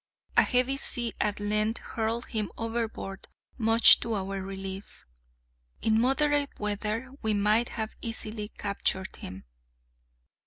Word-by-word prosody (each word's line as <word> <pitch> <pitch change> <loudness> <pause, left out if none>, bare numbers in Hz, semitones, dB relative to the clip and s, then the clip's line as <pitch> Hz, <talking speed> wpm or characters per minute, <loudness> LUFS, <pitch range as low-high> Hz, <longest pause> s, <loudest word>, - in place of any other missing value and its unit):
A - - +8
heavy 255 +1 +2
sea 240 -4 -3
at 210 -1 0
length 215 +2 +1
hurled 230 +1 -2
him 215 -3 -2
overboard, 225 -4 -4 0.3
much 225 0 +8
to 230 -1 -2
our 195 0 -3
relief. 195 0 -7 0.8
In 220 0 +3
moderate 285 +2 +2
weather 210 +4 -2
we 215 -1 +1
might 210 +4 +3
have 220 -1 -4
easily 215 -2 -4
captured 200 -2 -2
him. 95 -2 -9
220 Hz, 120 wpm, -28 LUFS, 205-235 Hz, 0.8 s, A